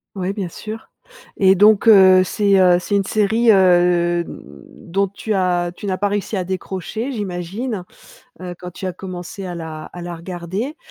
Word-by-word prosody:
Oui, 190 +1 -2
bien 195 -4 -4
sûr, 220 +5 -9 0.5
et 190 -1 +5
donc 210 +3 +4
heu, 190 -3 +7
c'est, 200 0 +2
heu, 180 -1 +5
c'est 200 +3 -2
une 200 - +2
série, 220 +3 +2
heu, 175 -2 +3
dont 165 - -5
tu 205 +2 -4
as 175 -2 0
tu 210 - -9
n'as 185 -2 -1
pas 205 - +1
réussi 205 +1 -3
à 185 - -1
décrocher, 190 +7 -4
j'imagine, 200 +1 -4 0.6
heu, 180 -1 -7
quand 180 0 -9
tu 190 - -8
as 185 - -3
commencé 185 +1 -8
à 180 - -5
la 160 -2 -7
à 175 - -10
la 175 0 -6
regarder? 185 - -5
185 Hz, 175 wpm, -19 LUFS, 175-205 Hz, 0.6 s, heu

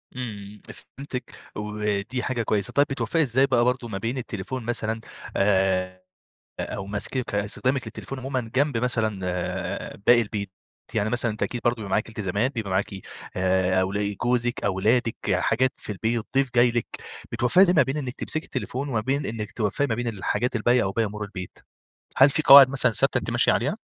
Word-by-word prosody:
إمم، 105 -4 -7 0.4
فهمتِك 135 -2 -6 0.2
ودي 105 +3 -2
حاجة 120 -3 -1
كويسة، 105 -3 -1
طيب 145 0 +4
بتوفقي 135 +4 0
إزاي 130 -1 +3
بَقى 125 -3 +2
برضه 125 -1 0
ما 105 -4 -4
بين 115 +6 -3
التليفون 120 +2 -5
مثلًا 115 -1 -2 0.4
آآ، 95 -2 +1 0.6
أو 95 - -4
مسك 105 +3 -2
استخدامِك 125 +6 0
للتليفون 135 - -7
عمومًا 130 -3 -3
جنب 140 -1 +2
مثلًا 115 -4 0
آآ، 90 0 -3
باقي 120 0 +7
البيت؟ 105 -3 -4 0.4
يعني 110 -1 0
مثلًا 120 0 0
أنتِ 105 - -3
أكيد 120 - -3
برضه 120 0 +2
بيبقى 110 -4 -7
معاكِ 110 +3 0
التزامات 105 +3 -1
بيبقى 110 -4 -3
معاكِ 95 +2 +1 0.5
آآ 95 0 +2
أول 100 +2 -1
جوزِك 120 0 0
أولادِك 110 +5 +1 0.2
حاجات 120 +7 +2
في - - -7
البيت 110 +2 -2
ضيف 135 -1 +3
جاي 120 +1 +6
لِك 120 -1 -1 0.5
بتوفقي 125 +10 +3
إزاي 185 -2 +6
ما 155 - +6
بين 135 +3 -3
إنِك 130 -4 -4
تمسكي 155 - -3
التليفون 130 +2 -4
وما 115 -5 0
بين 135 +5 -1
إنك 110 -2 -4
توفقي 110 +6 -1
ما 115 - -1
بين 120 +1 -3
الحاجات 115 +3 -1
الباقية 120 +2 +3
أو 95 - -1
باقي 115 +3 0
أمور 105 0 -5
البيت؟ 95 -3 -8 0.6
هل 135 +2 +7
في 155 - 0
قواعد 140 -2 +10
مثلًا 130 -3 +4
ثابتة - - +3
أنتِ - - -4
ماشية - - +3
عليها؟ - - 0
115 Hz, 180 wpm, -25 LUFS, 100-125 Hz, 0.6 s, قواعد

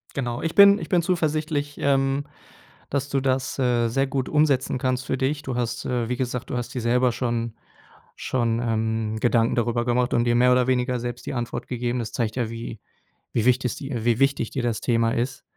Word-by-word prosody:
Genau. 120 -3 -3
Ich 165 - -2
bin 200 0 +8
ich - - -7
bin 175 -2 +3
zuversichtlich, 155 -4 -1
ähm, 135 0 +1 0.7
dass 140 0 -1
du 135 0 0
das, 135 0 -1
äh, 120 -2 +2
sehr 135 +4 +1
gut 135 -1 -2
umsetzen 145 -4 +2
kannst 130 0 -1
für - - 0
dich. 140 +3 -1
Du 130 -3 -4
hast, 120 -2 -2
äh 120 -2 -1
wie 125 - -1
gesagt, 125 -1 -3
du - - -2
hast 120 +1 -4
dir 125 - -2
selber 120 +1 +2
schon 115 -2 -2 0.6
schon, 115 -2 -1
ähm, 110 -1 -1
Gedanken 115 0 +2
darüber 120 0 0
gemacht 125 +1 +1
und 120 0 +2
dir 120 0 +2
mehr 125 +1 +5
oder 125 0 +3
weniger 125 -1 +1
selbst 120 0 -5
die - - -4
Antwort 120 -2 -4
gegeben. 120 0 -2
Das 115 - -4
zeigt 110 -2 -2
ja, 120 -3 -1
wie 115 -1 -7 0.5
wie 115 - +1
wichtig 125 -1 +2
dir 130 -5 -5
wie 120 -1 +2
wichtig 135 -4 +1
dir 130 - -3
das 115 -3 -1
Thema 115 -2 +2
ist. 125 +2 -2
125 Hz, 210 wpm, -24 LUFS, 120-135 Hz, 0.7 s, bin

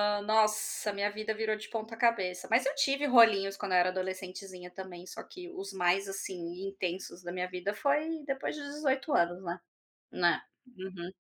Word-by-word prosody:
hã, 205 0 +2
nossa, 215 0 +2
minha 200 +1 0
vida 215 +1 -2
virou 220 0 0
de 215 - -9
ponta 225 0 -5
cabeça. 190 -7 +1
Mas 240 +4 +4
eu 280 - +1
tive 280 0 +2
rolinhos 220 -6 +6
quando 195 -2 -3
eu 180 - +6
era 180 +1 +5
adolescentezinha 185 0 -5
também, 180 -1 -8
só - - -7
que 360 -1 -10
os 195 - -6
mais, 190 +2 +2
assim, 185 -1 -5
intensos 180 -1 -4
da 175 - -5
minha 180 0 -2
vida 185 +2 -2
foi 300 +6 +1
depois 270 -2 -2
de 290 - -6
18 285 0 -1
anos, 175 +1 +3
né. 175 -1 -3 0.6
É, 250 -7 -1
uhum, 185 -2 -6
200 Hz, 180 wpm, -31 LUFS, 185-230 Hz, 0.6 s, rolinhos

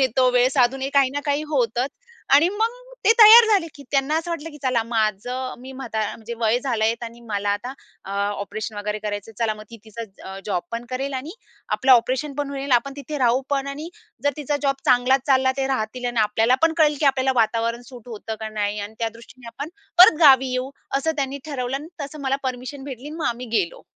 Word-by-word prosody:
येतो, 255 0 +3
वेळ 250 0 +4
साधून 260 0 +2
आहे 270 - -2
काही 275 -2 +4
ना 285 - -1
काही 285 +1 +1
होतच 250 -3 0 0.5
आणि 300 +5 +6
मग 450 +5 -2 0.2
ते - - +7
तयार 450 +2 +10
झाले, 375 -5 +1
की 285 - -12
त्यांना 280 +2 +1
असं 330 +1 -5
वाटलं, 325 -1 -4
की 295 - -12
चला, 255 -3 +1
माझं 230 +3 -2
मी 260 +1 -9
म्हाता 255 -4 -5 0.2
म्हणजे 230 +1 -7
वय 225 +1 +2
झालं 240 -5 -1
आहे 225 +1 +2
आणि 230 +1 -12
मला 205 -1 -1
आता 245 +5 -7 0.7
ऑपरेशन 215 +1 -5
वगैरे 210 +1 -3
करायचं, 210 +1 -5
चला 225 -2 0
मग 215 - -11
ती 230 - -9
तिचा 215 -3 -9
जॉब 190 -4 -1
पण 230 +1 -4
करेल 270 +2 -3
आणि 265 +4 -5 0.4
आपलं 260 0 +3
ऑपरेशन 255 +4 +2
पण 285 -1 -2
होईल, 275 -1 -3
आपण 245 +3 +2
तिथे 290 +1 -5
राहू 250 0 +3
पण 275 -1 0
आणि 295 +4 -6 0.4
जर 285 - +4
तिचा 295 0 -1
जॉब 275 -1 +1
चांगलाच 250 +2 +4
चालला, 260 -2 +3
ते 270 - +1
राहतील 250 -1 -3
आणि 240 -2 0
आपल्याला 220 +3 +3
पण 325 0 +4
कळेल, 300 -2 +4
की 300 - +2
आपल्याला 265 -1 +2
वातावरण 230 +1 0
सूट 245 -3 -13
होतं 220 -1 -6
का 220 - -4
नाही 210 -1 -2
अन् 205 +2 -7
त्यादृष्टीने 230 +2 -7
आपण 275 +6 -6 0.3
परत 360 -3 +9
गावी 265 -4 +6
येऊ, 255 +1 -2 0.3
असं 320 +4 0
त्यांनी 275 -1 -2
ठरवलं 265 -3 -3
अन् 295 +3 -8
तसं 290 +2 -8
मला 270 0 +1
परमिशन 260 +2 -5
भेटली 270 0 -7
अन् 310 - -8
मग 320 - -1
आम्ही 240 +1 -3
गेलो. 170 -4 -3
255 Hz, 215 wpm, -22 LUFS, 230-280 Hz, 0.7 s, तयार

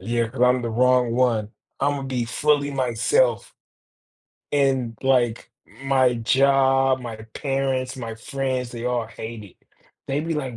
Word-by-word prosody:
yeah, 115 0 -1
'cause 115 - -8
I'm 125 0 +4
the 115 - -3
wrong 125 +1 +3
one. 115 -4 +1 0.3
Imma 140 -1 0
be 130 -3 -2
fully 145 +4 +1
myself. 135 - +1 1.0
And 130 -5 +1
like, 125 -4 +1 0.3
my 130 -2 +3
job, 135 +2 +3
my 120 -3 -6 0.2
parents, 135 -2 -2
my 115 -3 -6
friends, 130 +1 -3
they 120 -1 -7
all 125 -2 -1
hate 110 -1 -8
it. 95 - -16 0.5
They'd 145 +4 -2
be 165 - 0
like, 135 -5 -4
130 Hz, 140 wpm, -23 LUFS, 120-135 Hz, 1.0 s, I'm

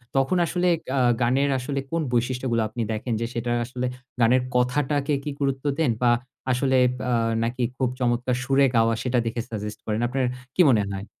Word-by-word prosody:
তখন 135 +7 +2
আসলে 180 +1 0 0.2
গা 135 - -1 0.2
গানের 130 +4 +2
আসলে 140 +2 -3
কোন 165 - 0
বৈশিষ্ট্যগুলো 125 0 0
আপনি 115 +2 -5
দেখেন? 110 +2 -2
যে - - 0
সেটা 120 +1 -2
আসলে 125 +1 -4 0.4
গানের 125 +3 +5
কথাটাকে 140 +3 +1
কি 150 - -3
গুরুত্ব 135 0 -1
দেন 155 -7 +3
বা, 120 -1 +4 0.4
আসলে 130 +1 +2 0.3
আ - - +1 0.3
নাকি 120 +2 -1
খুব 130 -2 +1
চমৎকার 125 0 +1
সুরে 135 +1 +3
গাওয়া, 115 0 +4
সেটা 125 -1 +1
দেখে 115 +1 -2
সাজেস্ট 105 -1 -5
করেন? 110 0 -1
আপনার 130 +1 0 0.3
কী - - +5
মনে 110 -5 +4
হয়? 100 +1 -5
125 Hz, 175 wpm, -24 LUFS, 120-135 Hz, 0.4 s, গানের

